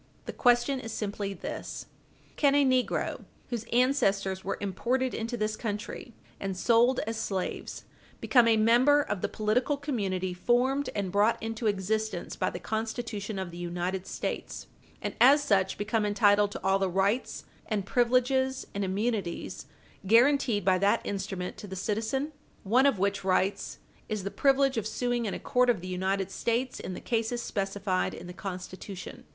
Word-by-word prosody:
The - - -5
question 245 +2 +3
is 225 -2 -6
simply 200 -2 -3
this: - - -6 0.5
can 285 -2 +3
a 285 -1 +5
negro 255 -1 0 0.3
whose 230 -2 -3
ancestors 200 -7 +2
were 195 - -2
imported 245 +7 -1
into 230 +2 -3
this 215 0 -1
country 215 +1 -5 0.2
and 195 -2 -3
sold 235 +5 +4
as 225 +1 -3
slaves 190 -4 -3 0.4
become 245 -3 +4
a 225 -1 +5
member 245 +7 +5
of 195 - -3
the - - -1
political 245 +7 0
community 195 -10 -2
formed 250 +8 +1
and 200 -3 -2
brought 205 +3 +3
into 225 0 -3
existence 215 +2 -1
by - - 0
the - - -6
Constitution 220 -2 -4
of 190 -2 -4
the 170 - -9
United 180 +2 -3
States, - - -4 0.4
and - - -2
as 280 +4 +7
such 195 -7 +2
become 215 +1 0
entitled 205 -1 +3
to - - -7
all 195 +1 +3
the 195 -1 +1
rights, 195 +7 0 0.2
and 210 -4 -1
privileges, 255 +3 +2
and 200 - -2
immunities, 195 -1 -2 0.4
guarantied 235 -2 +4
by 185 -1 +4
that 200 +2 +3
instrument 190 -2 -4
to 205 - -8
the 190 - -6
citizen, 225 +9 -1 0.3
one 250 +7 +4
of 275 - +2
which 200 +1 0
rights 190 +1 0 0.3
is 215 -3 -2
the 200 - -3
privilege 275 -2 +3
of 215 -1 -1
suing 245 0 -1
in 195 - -2
a - - -5
court 250 0 +2
of 235 -6 +3
the 180 - -8
United 190 +1 -1
States 240 +4 -1
in 185 - -5
the - - -6
cases 235 +1 -1
specified 195 -1 -1
in - - -9
the 180 - -8
Constitution? 185 0 -7
215 Hz, 165 wpm, -29 LUFS, 195-245 Hz, 0.5 s, as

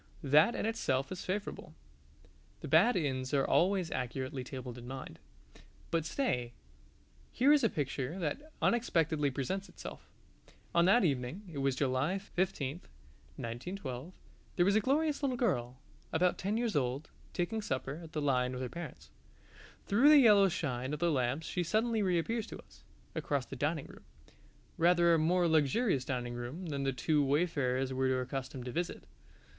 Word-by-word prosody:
That 150 - +5
in - - -2
itself 135 -12 -1
is 185 - -5
favourable: 200 +3 -4 0.9
the - - -6
bad 245 - +5
inns 135 -5 -1
are 135 - +3
always 185 -2 +2
accurately 130 +1 -3
tabled 125 -2 -7
in 120 - -10
mind. 130 +1 -7 0.7
But 165 -2 0
stay 125 - -1 0.8
here 275 +4 +4
is 295 - +4
a - - +4
picture 140 +2 -3
that 195 - -4
unexpectedly 160 -10 +2
presents 185 - -3
itself. - - -10 0.6
On 170 0 +4
that 225 +5 +5
evening 140 +4 -1
(it 140 - -4
was 135 -1 +1
July 135 +7 0
15, 180 -7 -2 0.6
1912) 130 +4 -6 0.4
there 175 - +3
was 200 +2 +3
a - - +6
glorious 290 +6 +1
little 265 -3 0
girl, 125 - 0 0.3
about 180 +2 +2
ten 205 +4 -1
years 230 -5 -1
old, 135 +1 -1 0.2
taking 220 +5 -2
supper 135 -3 -3
at 160 - -12
the 150 - -1
Lion 125 -2 +1
with 125 - -4
her 125 - -3
parents. 120 - -8 0.7
Through 235 +9 +5
the 305 - +9
yellow 210 -7 +7
shine 135 -6 -2
of - - -9
the 170 +1 +2
lamps 130 +2 0
she 180 - -2
suddenly 220 +5 +1
reappears 200 +5 0
to - - -8
us, - - -21 0.3
across 140 -3 -1
the 135 - -8
dining 145 +3 -1
room - - -14 0.8
rather 170 0 +5
a 165 - +4
more 175 +3 +3
luxurious 160 - +2
dining 125 -2 -3
room 120 +10 -6
than 140 -2 -2
the 135 - +2
two 145 +4 +1
wayfarers 135 -3 +1
were 130 0 +1
accustomed 130 0 -5
to 125 - -4
visit. 170 +6 -3
155 Hz, 160 wpm, -32 LUFS, 130-190 Hz, 0.9 s, the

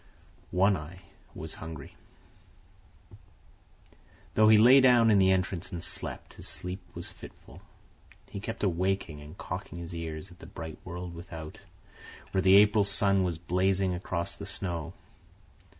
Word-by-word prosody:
One 95 +2 +3
Eye 80 +4 -9 0.4
was - - -6
hungry. 80 -4 -9 2.4
Though 110 0 +5
he 110 - +8
lay 125 +5 +8
down 120 -3 +6
in 100 - +5
the 95 0 +5
entrance 95 -1 -1
and 85 -2 -5
slept, - - -6
his - - -10
sleep 90 +2 -5 0.2
was - - -4
fitful. - - -13 0.7
He - - -5
kept 110 +3 -5
awaking 90 -4 0
and 75 +1 -12
cocking - - -6
his 85 0 -7
ears 80 +1 -6
at 90 - -16
the - - -11
bright 80 -1 -8
world 90 -1 -6
without, 80 -2 -9 0.7
where 95 - +1
the 95 +1 +7
April 105 0 +6
sun 100 -1 +3
was 85 -3 -1
blazing 95 +2 +1
across 90 -1 -3
the 100 - -7
snow. 90 -5 -4
90 Hz, 145 wpm, -29 LUFS, 85-100 Hz, 2.4 s, he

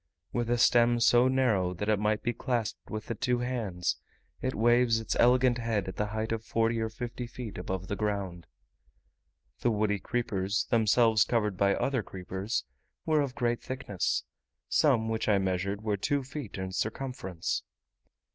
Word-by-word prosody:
With 120 -1 -1
a 120 - +2
stem 120 0 +4
so 120 +2 +5
narrow 110 -9 +2
that 105 +4 -4
it 110 -2 +2
might 105 0 0
be 120 - 0
clasped 120 -2 -3
with 110 0 -5
the - - -3
two 125 +2 0
hands, 115 -8 -2 0.4
it 130 0 -1
waves 120 0 +4
its 110 - -2
elegant 125 0 +4
head 115 -4 -1
at 95 - -6
the 105 - 0
height 110 +1 -3
of 115 -1 -2
forty 115 +1 +1
or 110 0 -1
fifty 120 +2 -5
feet 120 -5 -7
above 95 +1 -4
the 100 - -2
ground. 100 -5 -3 1.1
The 120 - +2
woody 105 -2 +1
creepers, 100 -3 -1
themselves 115 -1 +4
covered 105 -4 0
by 100 +1 +3
other 135 -3 0
creepers, 95 +2 -4 0.4
were 155 -1 +3
of 140 -2 -3
great 120 -2 0
thickness: 100 - -2 0.4
some 125 -7 +3
which 110 0 -1
I 105 - +5
measured 95 +2 -1
were 105 -2 0
two 140 +6 0
feet 135 -5 -7
in 95 0 -4
circumference. 110 -4 -3
110 Hz, 165 wpm, -29 LUFS, 100-120 Hz, 1.1 s, so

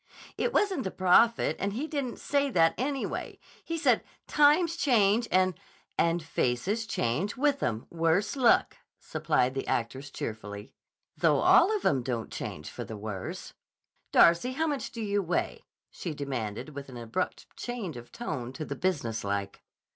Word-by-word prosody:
"It 480 - 0
wasn't 390 - +1
the 190 - -2
prophet, 190 +6 +4
and 200 0 -1
he 260 +8 -2
didn't 285 -5 -3
say 285 -1 0
that, 165 -8 +4
anyway. 270 +2 -3 0.3
He 330 0 -3
said, 325 - +3 0.2
'Times 305 +3 +4
change, 235 -7 +3
and—" 185 0 +3 0.4
"—and 170 0 +1
faces 165 - -1
change 155 - -1
with 280 0 +2
'em, 110 0 -1
worse 170 - +1
luck!" 255 -4 +3 0.2
supplied 125 +1 0
the 135 - -4
actress 130 +4 -2
cheerfully. 105 -1 -6 0.4
"Though - - +3
all 415 - +6
of 400 - -9
'em 135 - +3
don't 120 -2 -3
change - - -6
for - - -6
the 110 - -7
worse. 105 -3 -6 0.6
Darcy, 170 +10 +5
how 320 +4 0
much 290 -4 -2
do 230 -1 -5
you 205 -1 +1
weigh?" 175 -2 -2 0.3
she 165 -4 -5
demanded 130 -4 -4
with 140 -1 -8
an 125 - -9
abrupt 115 -1 -4
change 230 - -5
of 120 0 -10
tone 145 - -4
to 155 +2 -5
the - - -5
business 135 -12 -1
like. 100 0 -3
180 Hz, 160 wpm, -29 LUFS, -, 0.6 s, all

